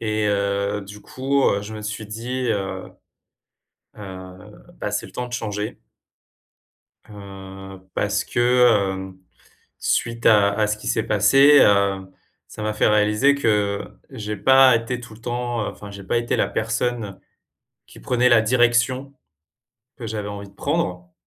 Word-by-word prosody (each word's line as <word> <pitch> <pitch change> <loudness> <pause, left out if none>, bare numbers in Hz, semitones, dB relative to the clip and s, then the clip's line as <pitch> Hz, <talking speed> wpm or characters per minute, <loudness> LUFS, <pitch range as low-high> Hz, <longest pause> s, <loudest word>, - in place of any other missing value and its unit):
Et, 110 -1 -1
heu, 100 0 -1
du 100 +1 -11
coup, 135 +4 -1
heu, 100 0 0
je 110 +1 -8
me 105 - -7
suis 105 0 -5
dit, 120 +4 -4
heu: 95 -3 -3 1.1
«Heu, 95 -2 -11
bah, - - -4
c'est - - -3
le - - -16
temps 125 - -4
de 120 - -11
changer». 105 -2 -4 1.3
Heu, 95 -1 -11
parce 100 0 0
que, - - -4
heu, 105 -7 +2 0.7
suite 115 0 -1
à 100 -2 +5
à 105 0 +1
ce 105 - -1
qui - - -9
s'est - - 0
passé, 140 +2 +5
heu, 100 -1 +3 0.4
ça 110 - -8
m'a 110 - -1
fait 105 - +2
réaliser 105 +6 +3
que 105 -6 0 0.3
j'ai 105 0 -5
pas 130 +1 +6
été 115 +2 -2
tout 120 -2 -12
le 110 - -16
temps, 120 -2 -3
enfin, 105 -1 -9
j'ai 100 0 -10
pas 105 - 0
été 120 0 -1
la - - +1
personne 115 -2 -2 0.7
qui - - -15
prenait 125 0 +2
la 115 -3 +5
direction 120 +3 +1 0.8
que 115 - -7
j'avais 105 -2 -4
envie 100 -1 -7
de 100 - -21
prendre 90 - -3
105 Hz, 155 wpm, -22 LUFS, 100-120 Hz, 1.3 s, pas